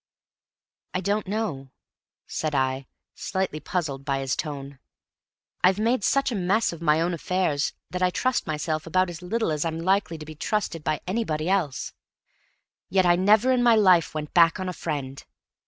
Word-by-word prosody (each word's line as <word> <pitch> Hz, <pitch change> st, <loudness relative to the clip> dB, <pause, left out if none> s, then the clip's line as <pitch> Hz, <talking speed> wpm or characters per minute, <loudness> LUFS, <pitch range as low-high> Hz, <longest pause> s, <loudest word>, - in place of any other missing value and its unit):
"I -, -, +2 dB
don't 200 Hz, +2 st, -1 dB
know," 190 Hz, -11 st, -3 dB, 0.6 s
said 155 Hz, -2 st, -3 dB
I, 130 Hz, 0 st, 0 dB, 0.3 s
slightly 190 Hz, -5 st, -3 dB
puzzled 150 Hz, -6 st, -3 dB
by 135 Hz, -1 st, -1 dB
his 135 Hz, -1 st, -1 dB
tone. 140 Hz, -2 st, -6 dB, 0.8 s
"I've 185 Hz, +1 st, +5 dB
made 225 Hz, +1 st, +1 dB
such 275 Hz, +3 st, +2 dB
a -, -, -2 dB
mess 195 Hz, +2 st, +1 dB
of 170 Hz, -, -10 dB
my 155 Hz, -1 st, +3 dB
own 170 Hz, +2 st, 0 dB
affairs 170 Hz, -3 st, 0 dB, 0.2 s
that 180 Hz, 0 st, -3 dB
I 185 Hz, -, +4 dB
trust 255 Hz, +7 st, 0 dB
myself 155 Hz, +1 st, -2 dB
about 185 Hz, +2 st, +1 dB
as 170 Hz, 0 st, -9 dB
little 220 Hz, +1 st, -1 dB
as 150 Hz, -1 st, -1 dB
I'm 165 Hz, -1 st, -2 dB
likely 185 Hz, -1 st, +1 dB
to 155 Hz, -, -9 dB
be 155 Hz, -, -9 dB
trusted 165 Hz, 0 st, -2 dB
by 155 Hz, -, -1 dB
anybody 180 Hz, -6 st, -1 dB
else. 175 Hz, -9 st, -1 dB, 1.0 s
Yet 190 Hz, 0 st, +3 dB
I 175 Hz, 0 st, +5 dB
never 210 Hz, +7 st, +4 dB
in 255 Hz, -1 st, +3 dB
my 240 Hz, -1 st, +5 dB
life 185 Hz, -7 st, +4 dB
went 150 Hz, -1 st, -5 dB
back 170 Hz, 0 st, +5 dB
on 185 Hz, -, -3 dB
a 180 Hz, -, -3 dB
friend. 140 Hz, -5 st, -5 dB
175 Hz, 175 wpm, -25 LUFS, 150-195 Hz, 1.0 s, I've